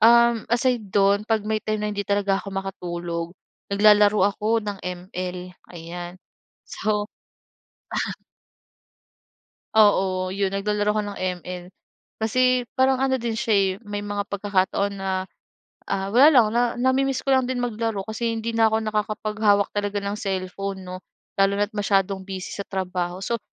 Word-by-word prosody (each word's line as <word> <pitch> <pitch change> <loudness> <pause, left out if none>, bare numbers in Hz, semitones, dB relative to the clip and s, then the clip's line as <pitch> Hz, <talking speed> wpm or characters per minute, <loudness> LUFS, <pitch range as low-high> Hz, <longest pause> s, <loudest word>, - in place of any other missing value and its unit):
um, 235 0 +5
aside 240 -2 +1
do'n, 200 +1 +3
'pag 220 -2 +1
may 215 0 0
time 215 -1 -2
na 210 - -1
hindi 205 - -2
talaga 200 -1 +1
ako 200 - -9
makatulog, 175 -3 -4 0.4
naglalaro 210 0 +5
ako 220 +2 0
ng 205 -2 -4
ML, 180 0 -5 0.2
ayan. 175 +1 -7 0.5
So 210 -1 -1 2.7
Oo, 190 -3 +3
'yon, 195 -1 0
naglalaro 205 +1 0
ako 210 0 0
ng - - -10 0.2
ML. 180 0 -7 0.5
Kasi 255 +3 +2
parang 260 0 +3
ano 265 0 +1
din 230 -2 -2
siya 225 -2 +1
eh, 195 -1 +3 0.2
may 205 0 -4
mga 205 0 -3
pagkakataon 200 0 0
na, 190 -1 -1 0.6
ah, 195 0 -2
wala 260 +4 +8
lang 250 -7 +6
na 240 - +4 0.2
nami-miss 260 +1 +1
ko 275 - -1
lang 260 -1 +2
din 250 -1 -2
maglaro 225 -3 -2
kasi 230 +1 -2
hindi 225 +1 -3
na 225 0 +5
ako 220 - +2
nakakapaghawak 215 -1 +1
talaga 205 0 -1
ng 200 +1 -3
cellphone 195 0 -3
'no, 180 0 -6 0.4
lalo 195 0 +4
na't 205 +1 +1
masyadong 195 -2 +1
busy 190 -2 -6
sa 200 - -5
trabaho. 180 -2 -3
So, 235 +4 -1
205 Hz, 150 wpm, -24 LUFS, 195-220 Hz, 2.7 s, wala